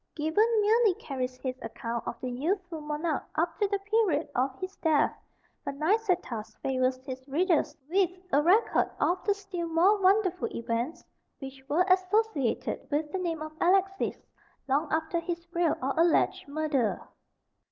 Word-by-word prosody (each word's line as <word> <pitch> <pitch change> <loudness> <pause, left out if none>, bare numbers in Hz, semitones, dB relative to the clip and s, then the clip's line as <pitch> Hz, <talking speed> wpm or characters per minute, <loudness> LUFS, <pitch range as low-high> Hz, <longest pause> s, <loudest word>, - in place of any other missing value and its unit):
Gibbon 320 +9 +2
merely 435 -2 +4
carries 255 -4 -4
his 255 0 -5
account 230 +1 -5
of - - -4
the 255 - -3
youthful 335 +5 -2
monarch 300 0 -2
up 330 +1 -1
to 410 - +3
the 400 0 0
period 395 -6 +1
of 260 +1 0
his 370 +1 -5
death, 315 -3 +2 0.5
but 275 - -4
Nicetas 315 - 0
favours 255 -1 +1
his 260 -1 -6
readers 330 +3 +1
with 370 +2 +3 0.2
a 285 - +5
record 375 +9 +3
of 355 - +1
the 405 - +3
still 385 -4 -5
more 365 +6 +3
wonderful 375 0 +3
events 235 +8 -3 0.3
which 270 -1 -9
were 345 +5 +3
associated 370 - +1
with 300 0 -1
the 380 - -2
name 330 -3 -2
of 310 - -7
Alexis, 385 +2 +2 0.5
long 290 +3 +1
after 320 +2 0
his 340 0 -4
real 340 -3 +2
or 270 +1 0
alleged 330 -2 +2
murder. 285 -6 0
330 Hz, 150 wpm, -29 LUFS, 275-375 Hz, 0.5 s, a